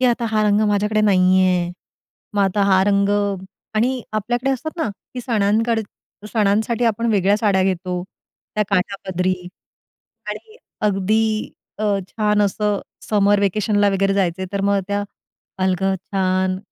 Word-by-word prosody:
की 255 - +2
आता 235 -1 +1
हा 215 -1 +2
रंग 210 0 +3
माझ्याकडे 210 +1 +1
नाही 185 -2 +4
आहे. 180 -1 +1 0.6
मग 200 - +3
आता 195 +1 +1
हा 190 0 +5
रंग 200 0 +2 0.7
आणि 245 +3 +1
आपल्याकडे 240 +5 -1
असतात 290 +5 -3
ना 320 - -1 0.3
की 250 - -4
सणांकड 225 0 +1 0.5
सणांसाठी 220 +2 +1
आपण 230 +1 +1
वेगळ्या 200 0 +3
साड्या 200 -3 +2
घेतो, 180 -1 -1 0.5
त्या 210 - +2
काठापदरी 185 -1 0 0.9
आणि 445 0 -7 0.3
अगदी 215 +2 0 0.3
अ, 215 - -2 0.2
छान 210 -1 +1
असं 205 0 0 0.3
समर 205 -1 +3
व्हॅकेशनला 205 +1 +2
वगैरे 195 0 +1
जायचं, 190 -1 0
तर 200 - -1
मग 200 0 +2
त्या 205 0 0 0.6
अलगद 190 +1 +1 0.2
छान 185 -1 +1
205 Hz, 135 wpm, -20 LUFS, 190-215 Hz, 0.9 s, हा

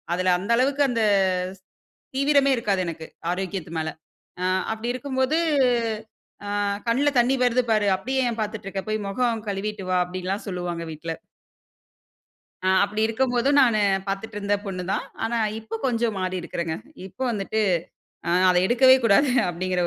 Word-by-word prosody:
அதில 185 0 +2
அந்த 200 +5 -3
அளவுக்கு 275 +3 +2
அந்த 230 -2 0 0.6
ஸ் - - -30 0.6
தீவிரமே 275 0 +4
இருக்காது 200 -5 0
எனக்கு. 160 -1 -6 0.2
ஆரோக்கியத்து 185 -2 -4
மேல. 160 0 -2 0.5
அ - - -1 0.3
அப்பிடி 230 +2 -3
இருக்கும் 260 +1 -4
போது, 290 +5 +2 1.1
"ஆ - - -6 0.4
கண்ணுல 275 +5 +3
தண்ணீ 245 +3 +3
வருது 250 +1 +2
பாரு. 210 -2 +3
அப்டீயே 265 +5 -1
ஏன் 230 - -6
பாத்துட்டு 215 -2 -4
இருக்க. 195 -1 -4
போயி 215 0 0
மொகம் 230 0 0
கழுவிட்டு 200 0 -3
வா" 185 - +3
அப்டீன்னெல்லாம் 185 +3 -4
சொல்லுவாங்க 175 -2 -4
வீட்ல. 165 +1 -5 1.5
அ - - +2 0.2
அப்புடி 210 +2 -1
இருக்கும்போதும் 245 +4 +1
நானு 235 -5 +4 0.3
பாத்துட்டு 205 +2 -4
இருந்த 205 0 +1
பொண்ணு 185 -2 -4
தான். - - -1 0.2
ஆனா 235 +1 0 0.2
இப்போ 225 0 -6
கொஞ்சம் 235 -4 0
மாறி 185 0 -2
இருக்கிறேன்ங்க. 165 -1 -3 0.3
இப்போ 255 +8 -6
வந்துட்டு, 215 +1 -1 0.7
ஆ - - +1 0.2
அத 180 - +3
எடுக்கவே 260 +3 +6
கூடாது 245 +7 +5 0.2
அப்டீங்குற 180 +1 -1
215 Hz, 150 wpm, -24 LUFS, 185-245 Hz, 1.5 s, எடுக்கவே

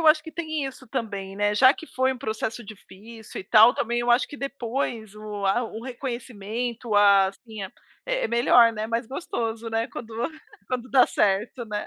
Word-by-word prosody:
eu 325 - +1
acho 310 0 +4
que 320 - -9
tem 315 -3 -3
isso 260 -2 -10
também, 200 -6 -4
né, 205 0 +1
já 260 +5 +7
que 320 - -11
foi 260 -2 0
um 255 - -9
processo 225 -1 -4
difícil 215 +2 -11
e - - -11
tal, 220 +3 +7
também 235 +1 -1
eu 240 0 0
acho 240 +2 +4
que 290 - -10
depois 240 -5 -4
o 210 -2 -5
a 220 +6 +2
o 225 -1 -6
reconhecimento 240 -2 -4
ah, 200 -2 +6 0.2
sim 220 -2 -8 0.4
é - - 0
melhor, 235 0 +5
né, 215 0 -4
mais 230 +1 -1
gostoso, 230 -5 -4
né, 225 +1 0
quando 225 -2 -9 0.5
quando 255 0 -4
dá 260 -2 +6
certo, 210 +5 0
né. 210 -2 -4
230 Hz, 185 wpm, -25 LUFS, 215-255 Hz, 0.5 s, já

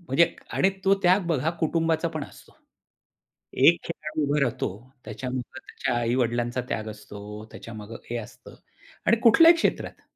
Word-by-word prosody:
म्हणजे 170 0 +2 0.2
आणि 190 - +3
तो 195 0 +5
त्याग 180 +1 +4
बघा 160 -2 +1
कुटुंबाचा 165 +1 +1
पण 155 -3 -5
असतो. - - -17 1.0
एक 165 +6 +6
खेळाडू 155 -2 -4
उभा 145 +1 +1
राहतो, 125 -5 0 0.4
त्याच्यामध्ये 130 0 -5
त्याच्या 125 - -2
आई-वडिलांचा 120 0 0
त्याग 110 0 -3
असतो. 105 0 -9
त्याच्यामागे 110 -1 -9
हे 120 - -2
असतं 120 +2 -10 0.5
आणि 230 +6 +5
कुठल्याही 330 +9 +8
क्षेत्रात. - - -1
135 Hz, 135 wpm, -26 LUFS, 120-170 Hz, 1.0 s, कुठल्याही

